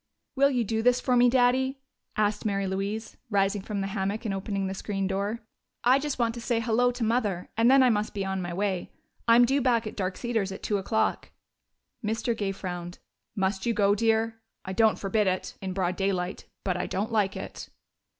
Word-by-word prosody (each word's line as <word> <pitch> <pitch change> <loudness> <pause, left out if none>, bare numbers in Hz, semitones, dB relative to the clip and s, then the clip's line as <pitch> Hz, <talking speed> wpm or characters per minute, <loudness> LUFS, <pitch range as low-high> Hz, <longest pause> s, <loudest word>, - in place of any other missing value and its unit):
"Will 275 +1 +5
you 250 -4 +1
do 220 +1 -1
this 250 +1 +4
for 250 0 +1
me, 245 0 +6
Daddy?" 260 +2 +3 0.4
asked 210 0 +1
Mary 200 -2 0
Louise, 195 +3 -3
rising 200 -1 +1
from 200 0 -3
the - - -1
hammock 200 +3 -2
and 205 - -1
opening 195 0 -2
the 190 - -2
screen 195 0 -3
door. 200 +4 -2 0.4
"I 255 +3 +5
just 295 0 -3
want 230 -2 +1
to 235 - -7
say 235 -1 0
'hello' 235 +2 +2
to 245 -1 -3
Mother, 215 -6 0
and 230 +2 +4
then 270 0 +7
I 250 - +5
must 210 -1 -1
be 195 -1 -1
on 190 0 -2
my 175 -1 -4
way. 190 0 -1 0.4
I'm 235 +1 +7
due 275 +3 +2
back 240 -3 +2
at 215 - -6
Dark 185 -2 -2
Cedars 225 -5 -1
at 195 - -8
two 205 - +1
o'clock." 220 +3 0 0.7
Mr. 225 +2 -1
Gay 200 -3 -1
frowned. 175 -2 -6 0.4
"Must 190 0 -1
you 230 - +1
go, 200 -1 +4
dear? 225 +1 +1 0.2
I 190 - -4
don't 220 +2 +4
forbid 205 +1 +1
it, 185 0 -1
in 190 -1 -3
broad 180 -1 -1
daylight, 190 -1 -1 0.2
but 185 -2 0
I 180 0 -2
don't 205 +5 -2
like 205 -3 +1
it." - - -7
210 Hz, 210 wpm, -27 LUFS, 195-235 Hz, 0.7 s, then